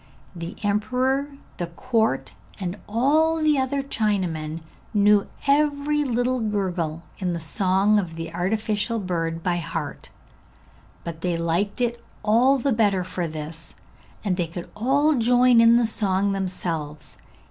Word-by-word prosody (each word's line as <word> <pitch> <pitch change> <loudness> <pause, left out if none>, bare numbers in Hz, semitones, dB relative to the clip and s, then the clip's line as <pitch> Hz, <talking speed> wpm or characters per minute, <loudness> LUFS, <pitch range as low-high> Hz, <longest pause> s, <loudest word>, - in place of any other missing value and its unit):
The 170 +1 -6
emperor, 250 +7 +1 0.3
the 175 - -3
court, 220 - 0 0.3
and 180 -1 -3
all 295 +9 +3
the 305 -3 +3
other 270 +1 0
Chinamen 180 - -1 0.3
knew 205 0 +4 0.2
every 295 +1 +2
little 250 -1 0
gurgle 185 -7 -2 0.2
in 180 -3 -1
the 170 - -3
song 195 +5 +2
of 170 -5 -4
the 165 0 -6
artificial 215 +5 -1
bird 165 -4 -2
by 175 -1 +1
heart; 170 - -5 0.9
but 165 -1 -6
they 175 -1 0
liked 170 +7 -1
it 235 -1 -1 0.2
all 240 +6 +4
the 270 +1 +1
better 205 -4 +2
for 180 -1 -3
this, 155 +1 -7 0.5
and 185 -3 +1
they 175 -3 0
could 170 +1 -8
all 280 +7 +3
join 245 -1 +5
in 230 +1 +7
the 240 - +3
song 200 -3 0
themselves. 170 -6 -4
205 Hz, 135 wpm, -24 LUFS, 175-245 Hz, 0.9 s, in